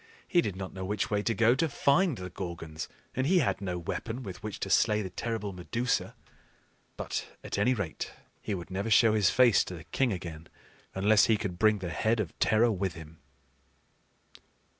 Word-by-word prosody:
He 175 - +4
did 100 - -3
not 95 -1 -6
know 95 - -6
which 105 +3 -2
way 105 -1 +2
to 115 +2 0
go 115 +3 +5
to 160 +5 +1
find 145 +2 +2
the 90 -1 -7
Gorgons, 80 -4 -6 0.3
and 130 +1 0
he 185 +3 +4
had 135 - +1
no 90 -2 -2
weapon 115 +8 -4
with 95 -5 -8
which 105 -1 -6
to 95 - -2
slay 105 +1 +3
the 95 - -6
terrible 105 +1 -3
Medusa. 115 +7 -2 0.8
But - - -3 0.2
at - - -3
any 125 +5 +3
rate 100 -8 -4 0.3
he 105 - -2
would 90 0 -8
never 100 +4 -2
show 110 0 +6
his 105 -4 +4
face 120 -4 +5
to 90 - -6
the 80 - -10
king 130 +8 0
again, 85 -3 -6 0.5
unless 105 +2 +5
he 110 - +3
could 90 -4 -4
bring 110 -1 +4
the 90 -3 -5
head 110 +9 +1
of 95 -7 -2
terror 115 +2 +4
with 95 -3 -2
him. 80 0 -11
105 Hz, 195 wpm, -29 LUFS, 90-115 Hz, 0.8 s, show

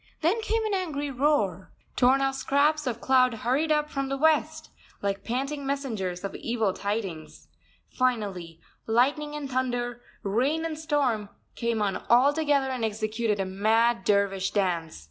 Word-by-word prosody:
Then 360 +8 +2
came 445 0 0
an 430 - -1
angry 300 -7 -2
roar. 245 - 0 0.2
Torn 260 +2 +4
off 270 0 +1
scraps 290 +2 +1
of 235 -2 -2
cloud 255 -2 +3
hurried 265 +8 0
up 300 0 +2
from 275 -2 -3
the 275 - -1
west, 315 +1 +1 0.3
like 200 0 -1
panting 275 +4 -3
messengers 225 -11 -3
of 195 - -4
evil 225 -5 -1
tidings. 200 -7 -5 0.4
Finally, 200 -10 -2 0.3
lightning 285 +6 +1
and 295 -2 -4
thunder, 245 -2 -2 0.2
rain 260 +11 0
and 315 -2 -4
storm, 275 -10 0 0.2
came 235 -2 -1
on 195 -2 0
altogether 280 +2 +3
and 255 -3 -3
executed 215 0 -1
a 195 - 0
mad 220 +3 +2
dervish 195 -2 +1
dance. 175 - -1
250 Hz, 145 wpm, -27 LUFS, 205-290 Hz, 0.4 s, Torn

